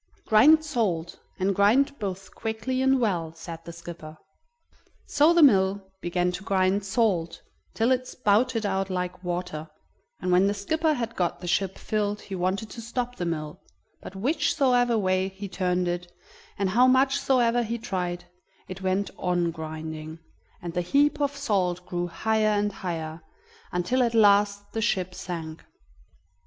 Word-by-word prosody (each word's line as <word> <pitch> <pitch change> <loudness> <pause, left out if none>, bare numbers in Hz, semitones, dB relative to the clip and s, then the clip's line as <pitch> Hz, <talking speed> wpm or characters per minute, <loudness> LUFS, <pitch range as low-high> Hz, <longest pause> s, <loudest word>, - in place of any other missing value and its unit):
"Grind 305 +9 +6
salt, 185 - -1 0.2
and 190 +1 +1
grind 235 +9 +3
both 195 -2 -5
quickly 225 +4 -3
and 265 0 +3
well," 170 -8 -1
said 165 0 -9
the 170 - -7
skipper. 165 -2 -10 0.9
So 295 +3 +4
the 340 -2 +5
mill 195 -5 +3
began 180 +1 0
to 180 +2 -6
grind 190 +1 +1
salt, 190 -5 0 0.3
till 230 +3 +2
it 255 0 +1
spouted 225 -1 +1
out 195 -1 -1
like 180 0 -3
water, 175 -3 -4 0.5
and 180 - -2
when 180 +2 +5
the 205 - 0
skipper 315 +10 0
had 230 -2 -4
got 175 -2 -1
the 180 - -7
ship 185 +2 0
filled 210 -1 -1
he 195 - -9
wanted 190 +4 -2
to 230 - -8
stop 245 +2 -4
the 175 - -2
mill, 155 -2 -4 0.4
but 195 - -10
whichsoever 245 0 +2
way 185 -2 +1
he 195 +1 -7
turned 180 -1 -1
it, 175 0 -3 0.5
and 195 -1 0
how 245 +5 +5
much 265 +2 +3
soever 245 -2 +2
he 235 0 -2
tried, 180 -5 -3 0.4
it 185 0 -8
went 190 +1 0
on 175 -2 0
grinding, 160 0 -7 0.5
and 170 -1 -5
the 180 - 0
heap 290 +10 +2
of 285 0 0
salt 185 -9 0
grew 175 -1 -2
higher 215 +4 +1
and 205 0 0
higher, 165 -4 -5 0.5
until 180 +9 0
at 235 -2 +1
last 205 -1 +4
the 225 - -2
ship 185 -5 0
sank. 165 -4 -6
195 Hz, 160 wpm, -26 LUFS, 175-230 Hz, 0.9 s, Grind